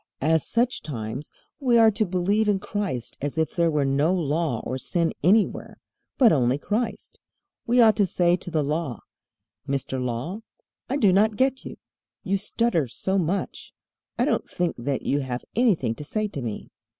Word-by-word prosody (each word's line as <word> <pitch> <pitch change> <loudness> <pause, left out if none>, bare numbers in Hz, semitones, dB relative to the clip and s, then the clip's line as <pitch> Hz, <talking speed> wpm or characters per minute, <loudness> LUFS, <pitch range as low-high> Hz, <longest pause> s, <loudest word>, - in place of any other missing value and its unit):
As 160 0 +2
such 240 +2 +1
times 125 -1 -6 0.3
we 250 -4 +3
are 225 -1 +6
to 215 0 0
believe 195 +4 +1
in 205 - +3
Christ 200 - -4
as 145 +3 -3
if 160 0 0
there 170 -1 +3
were 150 -3 +1
no 140 +5 +2
Law 155 -6 -1
or 130 - -3
sin 170 +3 0
anywhere, 205 +6 +2 0.4
but 245 -5 +6
only 130 -2 +2
Christ. 220 +8 -3 0.5
We 245 +1 +3
ought 220 -2 +5
to 205 -3 +3
say 175 -1 +2
to 180 - -7
the 160 -3 0
Law: 145 - -2 0.7
"Mister 135 -1 -2
Law, 125 - -3 0.5
I 275 - 0
do 205 -9 +4
not 210 +3 +3
get 265 0 +1
you. - - -8 0.5
You 195 -1 0
stutter 190 - 0
so 190 +11 -1
much. 180 +3 -3 0.4
I - - +2
don't - - -1
think 175 -1 -1
that 135 +2 -2
you 140 - +1
have 130 -3 -4
anything 195 - +2
to 150 - -9
say 215 +8 -2
to 140 - -6
me." 115 -4 -6
170 Hz, 175 wpm, -25 LUFS, 140-210 Hz, 0.7 s, are